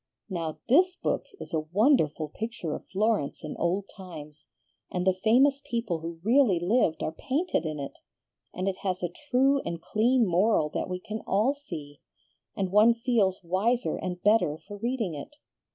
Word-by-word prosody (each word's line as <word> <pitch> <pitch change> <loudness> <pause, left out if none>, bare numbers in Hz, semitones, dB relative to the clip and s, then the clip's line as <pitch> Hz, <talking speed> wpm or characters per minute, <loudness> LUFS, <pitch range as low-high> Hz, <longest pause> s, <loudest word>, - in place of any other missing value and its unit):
Now, 165 -4 -3
THIS 360 +8 +4
book - - -1
is - - -9
a 160 - +2
wonderful 180 - +3
picture 215 -4 -4
of - - -7
Florence 205 -7 0
in 155 - -5
old 185 +3 0
times, 155 -6 -10 0.4
and 180 0 -2
the 190 - +4
famous 255 +9 +3
people 230 - -2
who 165 +1 -7
really 230 -5 +4
lived 175 -2 +1
are - - -1
painted 270 - -1
in 155 -1 -4
it, 140 - -7 0.5
and 185 +1 -3
it 195 - -1
has 185 -2 -3
a 175 -1 -2 0.2
true 270 +2 +4
and 170 0 -4
clean 235 +7 +2
moral 180 -3 +2
that - - -3
we 180 0 -3
can 215 +4 -6
all 215 +8 +2
see, 160 - -9 0.5
and 190 -2 -2
one 215 +3 +6
feels 225 -6 +1
wiser 210 +8 +1
and 180 -1 -5
better 205 -8 +3
for 200 +6 -11
reading 230 -4 -2
it. 285 - -8
195 Hz, 170 wpm, -28 LUFS, 170-235 Hz, 0.5 s, one